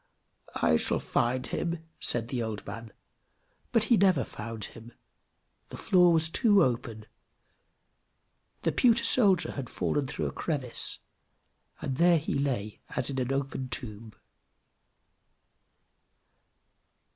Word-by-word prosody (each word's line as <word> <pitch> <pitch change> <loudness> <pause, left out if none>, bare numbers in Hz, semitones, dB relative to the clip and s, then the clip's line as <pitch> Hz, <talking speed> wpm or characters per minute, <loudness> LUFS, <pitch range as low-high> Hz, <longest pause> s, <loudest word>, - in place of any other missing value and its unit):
"I 80 - +3
shall - - 0
find 125 +2 -1
him!" 170 -1 -3 0.2
said 115 -1 0
the 125 -2 -2
old 110 -3 -5
man; 115 0 -8 0.8
but 230 -3 +3
he 230 +1 +3
never 185 -8 +3
found 115 0 -8
him. 115 +1 -13 0.8
The - - -9
floor 180 -2 +4
was 160 -1 +5
too 205 +2 +3
open 115 -3 -3 1.6
the - - +1
pewter 235 -2 +3
soldier 195 -9 +4
had 135 -4 -6
fallen 145 -2 -1
through - - -4
a - - -2
crevice, 135 -7 -2 0.9
and 130 -1 -3
there 170 0 +5
he 155 - -3
lay 125 -7 -2 0.2
as - - -2
in 135 - -3
an 125 +1 -2
open 135 -1 -3
tomb. 110 -2 -5
135 Hz, 120 wpm, -28 LUFS, 115-175 Hz, 1.6 s, was